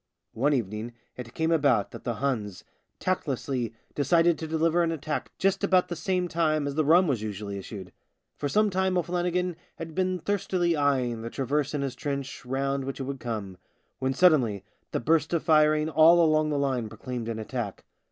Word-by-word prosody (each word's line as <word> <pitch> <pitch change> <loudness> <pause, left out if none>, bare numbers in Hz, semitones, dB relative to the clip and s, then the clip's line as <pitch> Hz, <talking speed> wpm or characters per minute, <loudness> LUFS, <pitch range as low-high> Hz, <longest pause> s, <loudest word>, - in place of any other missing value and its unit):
One 140 +6 +2
evening 110 0 -3 0.2
it 120 -2 -9
came 160 0 0
about 140 -10 +2
that - - -10
the 120 - -1
Huns 105 -6 -2 0.4
tactlessly 135 - -2 0.2
decided 165 +4 +3
to 160 - -4
deliver 160 +2 +2
an 165 -1 +1
attack 155 -1 -3
just 195 +1 +1
about 185 -2 +3
the 175 - -3
same 180 +2 -1
time 155 -3 +1
as 140 - -2
the 155 +2 +1
rum 170 +5 +5
was 135 -9 0
usually 100 -1 -5
issued. 95 -2 -9 0.4
For 145 - -3
some 210 +3 +3
time 190 0 +1
O'Flannigan 180 0 -1 0.2
had 165 -1 -7
been 185 +1 0
thirstily 180 -1 0
eyeing 130 -6 +1
the 115 - -5
traverse 140 +3 -1
in 140 - -1
his 135 -2 -2
trench 140 +1 -4
round 135 +1 -1
which 135 +1 -5
it - - -2
would 135 0 -5
come 105 -6 -5 0.2
— - - -45
when 130 0 -1
suddenly 125 - +4 0.3
the - - -1
burst 160 +5 +1
of 165 - -1
firing 155 -1 +4
all 160 +2 +6
along 155 -1 +2
the 145 - 0
line 130 -5 -1
proclaimed 115 +1 -5
an 115 - -3
attack. 110 -2 -5
145 Hz, 190 wpm, -27 LUFS, 120-165 Hz, 0.4 s, all